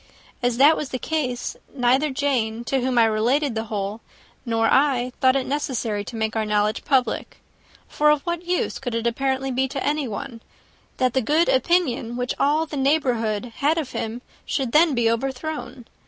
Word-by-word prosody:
As 245 -1 0
that 290 +4 +6
was 290 - -4
the 255 - -3
case, 255 -3 -2 0.2
neither 260 +4 +2
Jane, 250 -5 -1
to 270 +2 0
whom 255 0 0
I 230 - +7
related 240 +6 +1
the 220 0 -3
whole, 210 0 -4 0.5
nor 225 -1 +1
I, 255 -1 +2
thought 260 0 +5
it 265 -1 0
necessary 245 -7 -2
to 235 - -8
make 220 0 -2
our 220 - +1
knowledge 210 +1 0
public; 265 -3 0 0.5
for 300 0 +2
of 300 -1 +3
what 345 0 -3
use 360 +1 -1
could 245 -3 -4
it 230 0 -2
apparently 265 +2 0
be 260 +1 +1
to 265 +1 -4
anyone, 265 -5 -3 0.6
that 255 -2 +1
the 265 - +2
good 305 +8 +2
opinion, 260 -4 +1
which 250 0 -1
all 300 +3 +2
the 300 -2 -6
neighbourhood 245 -6 0
had 300 +3 +2
of 300 -6 -3
him, 230 +3 -4 0.2
should 265 -5 -2
then 310 0 +4
be 235 -1 +2
overthrown? 265 +2 -3
255 Hz, 180 wpm, -23 LUFS, 230-285 Hz, 0.6 s, I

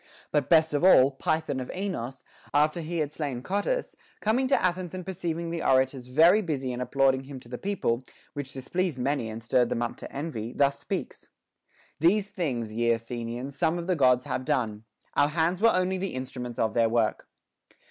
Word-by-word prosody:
But 145 -3 +1
best 160 -2 +5
of 145 - 0
all, 140 -7 +7
Py 155 +4 0
thon 140 -4 -3
of 130 - -6
Aenos, 180 -10 -4 0.3
after 155 +3 +3
he 165 +2 -4
had 150 -2 -1
slain 140 -6 -4
Cotys, 205 - -1 0.2
coming 245 +5 +1
to 275 - +3
Athens 180 -1 -1
and 185 -2 -6
perceiving 170 -2 -3
the 170 -1 -3
orators 130 -1 +2
very 165 +10 +5
busy 135 -8 -2
in 125 - -4
applauding 135 0 +2
him 135 -1 -8
to - - -15
the 125 +1 -6
people, 155 -12 -1 0.3
which 140 -2 -5
displeased 150 +4 -2
many 125 -2 -1
and 110 +1 -7
stirred 120 +1 +2
them 120 - -1
up 120 - -4
to - - -9
envy, 130 -6 -4
thus 140 0 +2
speaks: - - -5 0.7
These 200 +5 +3
things, 125 - -2
ye 115 +1 +1
Athenians, 120 +3 -3
some 160 +3 +1
of 170 - -4
the 185 0 +1
Gods 125 -4 +4
have 130 - -2
done; 110 -4 -1 0.3
our 145 - +4
hands 170 +4 0
were 230 - +7
only 185 -1 +1
the 195 -5 -3
instruments 125 -2 -5
of 110 -1 +1
their 115 -1 +3
work. 115 -1 0
140 Hz, 195 wpm, -27 LUFS, 125-175 Hz, 0.7 s, all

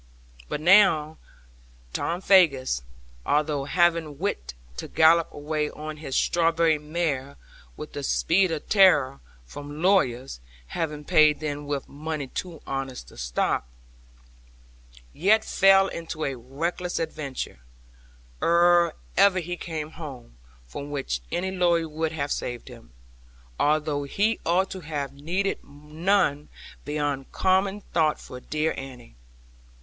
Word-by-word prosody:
But 150 - -3
now 160 -4 +5 0.7
Tom 175 +2 -2
Faggus, 140 - +4 0.4
although 150 - 0
having 165 -2 +1
wit 65 - -3 0.2
to - - -5
gallop 165 +1 +4
away 150 0 -2
on 155 0 -7
his 145 -4 -5
strawberry 165 -2 +2
mare, 150 -3 -3 0.4
with 150 - -8
the 145 - -4
speed 180 +6 +2
of 155 -2 -4
terror, 150 -10 +5 0.3
from 145 - -8
lawyers 135 - +2 0.3
(having 150 - -3
paid 150 0 +5
them 145 -1 -4
with 145 -2 -3
money 150 0 -5
too 165 +4 -7
honest 135 - -5
to - - -16
stop), - - -1 1.5
yet 210 +7 +3
fell 195 0 +5
into 160 -3 -5
a 135 - -1
reckless 165 +9 -3
adventure, 155 - -4 0.8
ere 170 0 +4 0.2
ever 195 0 +5
he 175 0 -3
came 160 -3 -5
home, 135 - -9 0.3
from 140 - -7
which 135 - -3
any 190 +2 -1
lawyer 175 -3 +2
would 160 +1 -2
have 145 -3 -3
saved 120 -1 -4
him, - - -14 0.7
although 150 -1 +1
he 210 +10 0
ought 185 +3 +2
to 190 - -5
have 150 -4 -4
needed 175 +8 -2
none 150 +1 -1 0.4
beyond 145 -2 -2
common 190 +2 +1
thought 155 -3 +2
for 125 - -9
dear 155 +4 -1
Annie. 125 - -10
155 Hz, 125 wpm, -25 LUFS, 140-175 Hz, 1.5 s, now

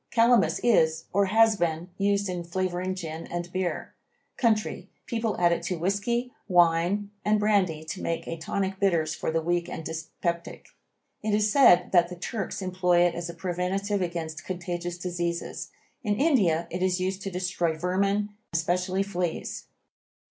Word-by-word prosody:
Calamus 235 0 +4
is, 160 -9 +3
or 200 +1 +3
has 220 +2 +5
been, 170 0 -1
used 200 0 +2
in 180 -2 -3
flavoring 185 +1 -2
beer 165 -2 -6
and 175 0 -4
gin. 185 -1 -2 0.5
Country, 220 -4 0 0.2
people 225 -2 -2
add 175 -1 +4
it 170 - 0
to 180 0 -1
whisky, 205 +8 -1
wine 175 +3 +3
and 210 0 +3
brandy 195 -7 +2
to 165 +4 -6
make 165 - -2
a - - -3
tonic 190 +4 -2
bitters 170 -6 +2
for - - -3
the 165 0 0
weak 175 +1 0
and 160 - -6
dyspeptic. 170 +1 -4 0.5
It 210 -1 +1
is 210 0 +2
said 210 -10 +6
that 175 -2 +4
the 180 - -6
Turks 195 +2 -4
employ 180 -1 +2
it 175 -1 +4
as 170 0 -4
a 170 - -7
preventive 190 +3 -1
against 170 -2 -4
contagious 175 -1 -4
diseases. 175 -1 -3 0.3
In 210 -3 +1
India 205 - +3
it 180 +2 -3
is 185 0 +1
used 190 +1 -2
to 195 - -3
destroy 180 -3 -1
vermin, 195 +4 +1 0.2
especially 180 +3 +1
fleas. 180 -4 -3
180 Hz, 160 wpm, -27 LUFS, 170-200 Hz, 0.5 s, said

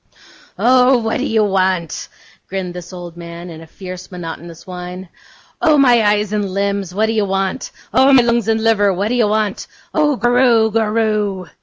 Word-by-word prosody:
'Oh, 255 +1 +4
what 225 -1 -1
do - - -1
you 220 -1 +2
want?' 185 -4 0 0.4
grinned 185 -2 -4
this 180 0 -9
old 175 -2 -9
man, 170 +1 -9
in 160 -1 -10
a 165 - -12
fierce, 185 +1 -9
monotonous 170 -2 -8
whine. 180 0 -8 0.5
'Oh, 315 -4 +4
my 245 -4 +5
eyes 210 0 +1
and 205 -2 -1
limbs, 200 -1 -2
what 210 +4 +1
do 225 - -1
you 215 -2 +1
want? 195 +4 -2 0.2
Oh, 265 +1 +5
my 260 -3 +6
lungs 235 -2 +1
and 220 0 +1
liver, 205 -3 +3
what 195 +3 -1
do - - -1
you 240 -3 +2
want? 210 -1 -1 0.3
Oh, 295 -2 +2
goroo, 240 -2 +3
goroo! 215 -4 -1
205 Hz, 180 wpm, -17 LUFS, 185-225 Hz, 0.5 s, my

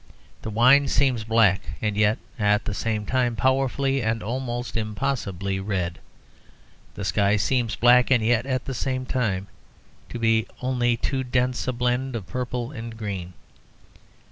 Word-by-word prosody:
The - - -5
wine 130 +6 +5
seems 130 -4 +1
black, 110 -3 +3 0.2
and 105 -2 -1
yet 105 +2 +3 0.2
at 105 0 +2
the 105 - -2
same 105 0 -2
time 120 0 0
powerfully 135 +1 +1
and 110 0 -1
almost 120 +1 -4
impossibly 105 -4 -2
red; 95 -4 -2 1.0
the 100 - -5
sky 100 0 +2
seems 115 +2 0
black, 125 +1 +5
and 120 -4 +3
yet 120 +2 +2
at 130 -2 -1
the 135 - -4
same 130 +1 -2
time 105 -8 -1 0.6
to - - -5
be 115 -1 +2
only 125 -2 +1
too 130 +3 -1
dense 125 0 -1
a - - +2
blend 125 +1 -1
of 110 -5 -4
purple 125 +1 -4
and 115 -4 -7
green. 95 -5 -5
115 Hz, 150 wpm, -24 LUFS, 105-130 Hz, 1.0 s, wine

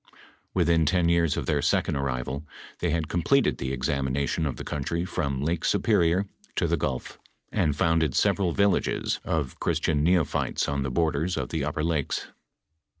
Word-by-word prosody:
"Within 85 -3 +3
ten 85 +1 +3
years 85 -2 +2
of - - -2
their 75 -2 +1
second - - +1
arrival, 70 +1 -2 0.4
tliey - - +1
had 80 -1 0
completed 110 - +2
the 65 0 -2
examination 70 +3 -1
of 70 - -3
the - - -7
country 85 +4 -2
from 70 -6 -2
Lake 80 +2 -1
Superior 85 +4 +2 0.3
to - - +1
the - - +2
gulf, 65 -2 -3 0.3
and 75 - +1
founded 80 -2 +2
several 95 -4 +2
villages 100 +2 +1
of 75 -6 -2
Christian 80 -2 +1
neo 85 +1 +4
phytes - - -1
on 70 0 -1
the 70 - -1
borders 80 +4 0
of - - -2
the 80 -3 -2
upper 75 +2 -2
lakes. 80 -4 -1
80 Hz, 165 wpm, -26 LUFS, 70-85 Hz, 0.4 s, neo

